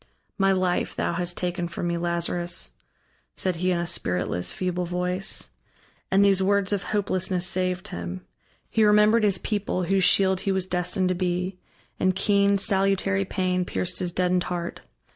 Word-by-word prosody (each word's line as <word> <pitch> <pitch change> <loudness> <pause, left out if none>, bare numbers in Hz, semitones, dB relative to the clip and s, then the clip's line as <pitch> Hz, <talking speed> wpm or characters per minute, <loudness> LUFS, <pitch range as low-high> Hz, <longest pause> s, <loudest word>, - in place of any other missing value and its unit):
"My 195 -1 +3
life 185 -2 0
thou - - -1
hast 175 0 -3
taken 175 -1 -2
from 170 +1 -5
me, 170 0 0
Lazarus," 170 - -1 0.6
said 185 -3 -1
he 180 +2 0
in 180 - +1
a 170 - -1
spiritless, 90 - -1
feeble 180 -1 -2
voice. 180 +2 -2 0.6
And 195 +1 +4
these 195 -1 +4
words 200 +1 +2
of 200 - 0
hopelessness 185 -3 0
saved 185 0 -1
him. 85 +1 -6 0.5
He 220 - +3
remembered 210 +2 +5
his 200 -2 +3
people, 205 -2 -2
whose 190 +1 +1
shield 190 0 +4
he 195 - -1
was 190 -1 0
destined 185 +1 0
to - - +2
be, 180 +1 -2 0.4
and 185 -1 +2
keen 200 0 +3
salutary 195 -1 +1
pain 185 -1 0
pierced 180 0 -2
his 180 -1 -1
deadened 180 0 +1
heart. 175 -1 -4
185 Hz, 160 wpm, -25 LUFS, 175-195 Hz, 0.6 s, remembered